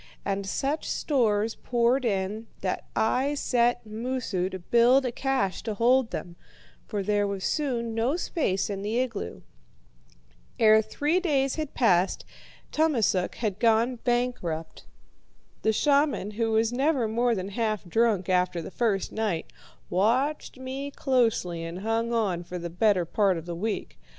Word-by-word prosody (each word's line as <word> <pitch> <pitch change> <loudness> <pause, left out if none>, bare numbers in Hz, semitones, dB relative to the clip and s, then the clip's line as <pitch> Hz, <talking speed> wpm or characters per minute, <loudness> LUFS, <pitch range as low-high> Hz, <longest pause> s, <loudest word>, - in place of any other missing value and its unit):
And 195 0 -2
such 280 +9 -2
stores 225 -6 +1
poured 245 +2 +1
in 210 +1 -1
that - - -2
I 260 +6 +1
set 240 -3 +1
Moosu 220 -4 -2
to 190 - -5
build 240 +8 +4
a 250 - 0
cache 260 -6 -1
to 220 -2 -4
hold 245 +2 +3
them, 175 -1 -6 0.5
for 205 -3 -2
there 205 0 +1
was 200 -1 -4
soon 240 -6 -1
no 230 +6 +1
space 195 - -1
in 200 -1 -4
the 215 +3 -2
igloo. 235 - -4 1.1
Ere 220 -1 +6
three 295 +10 0
days 275 -7 +1
had 310 -3 -4
passed 190 -6 +2 0.5
Tummasook 240 - +1
had 210 -4 -2
gone 230 +2 +3
bankrupt. 240 -10 -2 0.7
The 220 - +3
shaman, 280 -4 +2
who 225 +2 -1
was 225 +1 +2
never 270 -2 +1
more 235 +2 +1
than 190 -1 -4
half 215 0 -1
drunk 210 0 +1
after 180 -1 +1
the 165 - -7
first 210 -5 0
night, 210 -7 -2 0.3
watched 255 +12 0
me 265 +2 -5
closely 230 - 0
and 170 +3 -6
hung 225 +2 0
on 200 -7 0
for 180 +1 -6
the 170 -1 -5
better 190 -1 +2
part 195 +1 +2
of 165 - -7
the 175 - -5
week. 205 - -4
225 Hz, 150 wpm, -27 LUFS, 195-255 Hz, 1.1 s, Ere